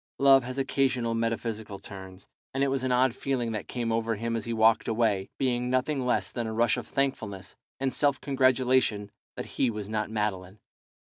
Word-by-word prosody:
Love 135 -1 +6
has 130 +2 -6
occasional 130 -3 +1
metaphysical 115 -2 -2
turns, 95 -1 -10 0.3
and 135 - +2
it 140 - +2
was 135 -1 -1
an 130 - 0
odd 125 0 +3
feeling 125 -3 -2
that 105 -2 -4
came 120 -2 -2
over 115 0 0
him 115 +2 -2
as 115 - -3
he 115 - -3
walked 110 0 +3
away, 110 -4 +1
being 125 -2 0
nothing 130 +2 0
less 125 - 0
than 120 -2 -3
a 110 - -4
rush 115 0 +3
of - - -6
thankfulness 105 -9 -2 0.2
and 135 -1 -1
self 140 -2 +2
congratulation 130 -6 +2 0.2
that - - -5
he 130 - 0
was 105 -3 -5
not 110 0 -2
Madeline. 105 -3 -3
115 Hz, 190 wpm, -28 LUFS, 110-130 Hz, 0.3 s, Love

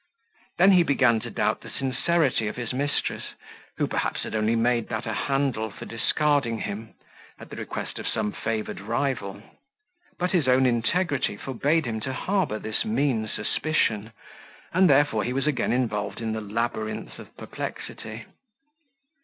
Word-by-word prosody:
Then 190 +3 +7
he 185 -2 +7
began 130 -7 +4
to - - -7
doubt - - 0
the - - -10
sincerity 135 -2 +1
of 105 - -3
his 120 -1 -4
mistress, 145 +2 -1 0.4
who - - +2
perhaps - - -1
had - - -5
only 110 +1 +2
made 115 0 +2
that 115 +1 -3
a 115 - -2
handle 135 -4 0
for 100 - -9
discarding 135 0 +1
him, 110 +1 -5 0.4
at - - -11
the - - -6
request - - -5
of - - -5
some 105 - 0
favoured 110 0 -3
rival; 110 -2 -2 0.7
but 180 +1 0
his 170 -8 +2
own 130 +1 +5
integrity 130 - +1
forbade 140 +6 +1
him 110 -2 -2
to 130 +5 -4
harbour 185 - 0
this 110 0 -1
mean 140 - +1
suspicion; 110 -1 0 0.6
and 185 0 +5
therefore 140 -6 +4
he 125 - -1
was 135 +1 0
again 140 -5 +1
involved 110 -5 -1
in 115 -1 -2
the 110 - -3
labyrinth 110 +1 -3
of - - -13
perplexity. 110 +1 -6
120 Hz, 155 wpm, -26 LUFS, 110-145 Hz, 0.7 s, Then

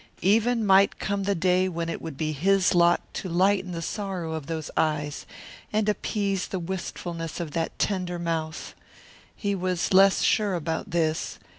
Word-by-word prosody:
Even 225 +4 +3
might 195 0 +5
come 200 -1 -2
the 200 0 +1
day 185 +2 +2
when 170 -1 -3
it 165 - -4
would 160 -4 -7
be 155 +1 -1
his 185 +6 +2
lot 175 0 +4
to 185 - -4
lighten 185 +2 +2
the 165 -1 -4
sorrow 185 -4 -4
of 155 -3 -5
those 160 -2 -4
eyes 150 -1 -1 0.4
and 215 0 +1
appease 200 -2 -1
the 190 - -3
wistfulness 170 -2 -5
of 165 -3 -4
that 165 +2 -3
tender 180 -3 -1
mouth. 165 -2 -3 0.6
He 205 -1 -1
was 185 -1 -1
less 195 +1 +6
sure 205 -3 +2
about 165 -1 -3
this. 160 -2 -1
180 Hz, 165 wpm, -26 LUFS, 165-195 Hz, 0.6 s, less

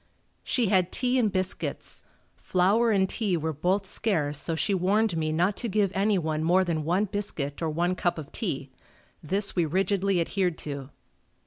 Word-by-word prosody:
She 235 -6 +1
had 185 -3 +2
tea 255 0 +1
and 220 -4 +2
biscuits. 185 -1 -3 0.3
Flour 200 +6 +2
and 195 -3 +3
tea 200 -4 0
were 160 0 -2
both 185 +7 0
scarce 150 -9 -1
so 165 +2 -1
she 200 +5 0
warned 195 +2 +2
me 155 -1 -1
not 180 +6 +1
to 235 - -2
give 200 -1 +1
anyone 180 -6 +1
more 180 +3 +4
than 165 -4 -1
one 180 +7 +1
biscuit 180 -9 -4
or 165 - 0
one 175 +4 0
cup 175 -1 -1
of 150 -3 -8
tea. 140 - -3 0.5
This 195 +6 -1
we 175 - +3
rigidly 190 +3 +1
adhered 180 0 0
to. 140 -2 -5
185 Hz, 175 wpm, -27 LUFS, 160-200 Hz, 0.5 s, more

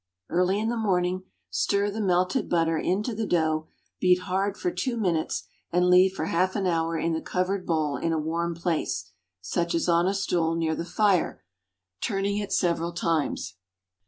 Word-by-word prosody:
Early 180 +3 +2
in 220 +1 0
the 240 - -1
morning 185 -3 0 0.3
stir 200 - +1
the 220 +2 -3
melted 185 -1 +1
butter 165 -1 +2
into 205 +8 0
the 220 0 -2
dough, 155 -3 +1 0.3
beat 180 -1 +4
hard 195 +2 -1
for 360 - -1
two 255 -7 -2
minutes, 175 -7 0 0.3
and 180 +1 +3
leave 185 +1 +6
for 160 - -3
half 185 +3 +1
an 200 -3 0
hour 165 -2 +1
in 165 +1 0
the 160 - -2
covered 185 +1 -1
bowl 155 -4 0
in 165 - -1
a 165 - +1
warm 165 +2 -1
place—such 150 - -3
as 165 - 0
on 170 +1 +3
a 195 - +1
stool 170 -4 0
near 165 -1 0
the 165 - -3
fire—turning 95 - -1
it 205 -1 -3
several 170 -1 +1
times. 160 - -1
175 Hz, 170 wpm, -26 LUFS, 160-190 Hz, 0.3 s, leave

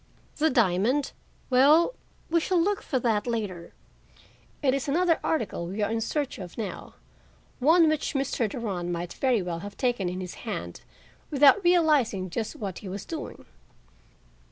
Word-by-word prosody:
"The 315 +2 +3
diamond—well, 260 - +2 0.4
we 335 - +4
shall 355 +2 +1
look 400 +4 +1
for 265 - -2
that 225 -2 0
later; 205 -8 -4 0.9
it 265 -2 +3
is 275 0 -2
another 330 +3 +2
article 210 - -1
we 200 +4 -3
are 205 - 0
in 225 0 -1
search 285 +3 -2
of 180 -3 -9
now, 220 -4 -6 0.6
one 320 +5 +5
which 310 -1 -1
Mr. 265 -4 0
Durand 195 -7 -3
might 175 0 -4
very 250 -7 +1
well 170 -2 -4
have 200 +3 -9
taken 240 -8 0
in 180 +1 -5
his 180 -1 -6
hand - - -5 0.5
without 295 +7 +5
realizing 295 - +3
just 220 +4 -3
what 195 -4 -5
he 195 - -8
was 195 +1 -6
doing. 325 -2 -7
240 Hz, 155 wpm, -27 LUFS, 195-300 Hz, 0.9 s, one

